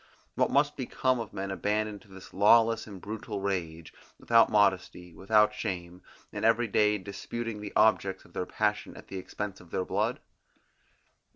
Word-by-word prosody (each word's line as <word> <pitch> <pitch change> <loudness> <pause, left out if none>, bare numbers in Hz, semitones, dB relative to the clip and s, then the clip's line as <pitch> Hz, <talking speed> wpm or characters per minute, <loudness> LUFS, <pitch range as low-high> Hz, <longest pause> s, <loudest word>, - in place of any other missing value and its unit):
What - - +1
must 145 +1 +2
become 130 0 0
of 115 -3 -6
men 95 0 -4
abandoned 105 +1 -2
to 115 - -20
this 95 -1 -13
lawless 115 +3 +4
and 100 -3 -9
brutal 105 +1 -6
rage, 85 -5 -4 0.2
without 115 -1 +4
modesty, 95 -4 +1
without 105 +4 +3
shame, 90 -3 -5 0.3
and - - -5
every 115 +1 +3
day 105 0 +2
disputing 105 +3 -6
the 105 - -6
objects 100 -3 +2
of 85 - -20
their 90 - -3
passion 105 -1 -1
at - - -13
the 95 - -5
expense 100 +1 -6
of 90 - -17
their 95 - -2
blood? - - -1
105 Hz, 165 wpm, -29 LUFS, 95-110 Hz, 0.3 s, lawless